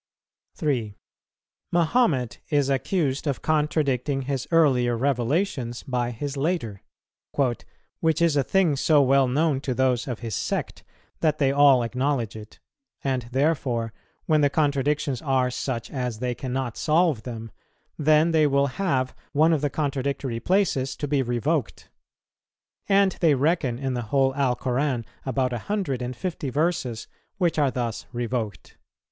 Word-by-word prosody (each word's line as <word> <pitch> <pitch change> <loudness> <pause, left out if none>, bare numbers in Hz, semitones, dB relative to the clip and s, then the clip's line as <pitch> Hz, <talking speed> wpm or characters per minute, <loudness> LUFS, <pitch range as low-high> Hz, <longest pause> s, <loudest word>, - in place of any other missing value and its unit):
3. 125 - -2 0.7
Mahomet 170 - +1
is 145 -3 +2
accused 140 0 0
of 140 -3 -2
contradicting 145 -3 0
his 135 0 -3
earlier 130 -8 +3
revelations 130 - -1
by 125 -3 -1
his 135 +4 -5
later, 135 - -2 1.2
"which 160 -1 +2
is 170 -3 +3
a 140 - +4
thing 175 +1 +2
so 150 +2 +3
well 135 -1 +4
known 140 +1 +1
to 130 -3 -2
those 130 -1 +1
of 120 -3 -4
his 115 -2 -4
sect - - -3 0.4
that 155 -2 +1
they 135 -3 +2
all 140 -3 +5
acknowledge 125 -1 -1
it; 110 -1 -11 0.5
and 130 -3 -1
therefore 130 -5 0 0.3
when 155 -2 +3
the 145 - +4
contradictions 145 -2 0
are 130 -3 +1
such 120 -2 -4
as 125 -4 -3
they 125 +2 -2
cannot 130 -1 -4
solve 155 -5 +2
them, 115 -1 -7 0.4
then 155 +2 +3
they 155 -2 +4
will 140 0 +3 0.2
have 130 -9 0 0.2
one 160 +3 +4
of 155 - +1
the 145 - +1
contradictory 135 -3 -2
places 140 - +1
to 145 - -4
be 140 -1 +1
revoked. 130 +3 -2 1.0
And 195 -1 +4
they 160 -4 +5
reckon 140 -3 +1
in 135 0 -2
the 120 - -2
whole 135 0 +2
Alcoran 130 -1 0 0.2
about 130 -1 0
a 120 - -2
hundred 190 - -1
and 125 +1 -4
fifty 160 -1 -4
verses 140 -6 -1 0.3
which 175 -5 +1
are 145 -2 +3
thus 120 -4 -4
revoked." 120 -6 -4
135 Hz, 145 wpm, -25 LUFS, 125-150 Hz, 1.2 s, all